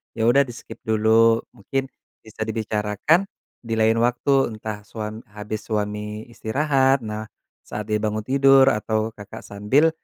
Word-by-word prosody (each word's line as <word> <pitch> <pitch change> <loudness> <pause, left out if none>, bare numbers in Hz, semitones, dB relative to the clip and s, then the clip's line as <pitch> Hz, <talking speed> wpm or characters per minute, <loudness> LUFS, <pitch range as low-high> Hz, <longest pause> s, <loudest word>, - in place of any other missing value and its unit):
ya 110 - -1
udah, 140 +2 +4
di-skip 120 -1 -10
dulu, 110 +1 +4
mungkin 135 +4 -4 0.3
bisa 110 0 -6
dibicarakan 110 - +1 0.4
di 115 - -3
lain 110 +1 +3
waktu, 125 +1 +2
entah 110 -1 -6
suam 110 0 -6
habis 105 0 -5
suami 105 0 -3
istirahat. 135 +3 +1
Nah, 110 0 -5 0.4
saat 105 0 -6
dia 105 - +3
bangun 110 0 -1
tidur, 135 +2 +5
atau 110 +1 -1
Kakak 105 -1 -9
sambil, 105 +11 +2
110 Hz, 140 wpm, -23 LUFS, 105-130 Hz, 0.4 s, tidur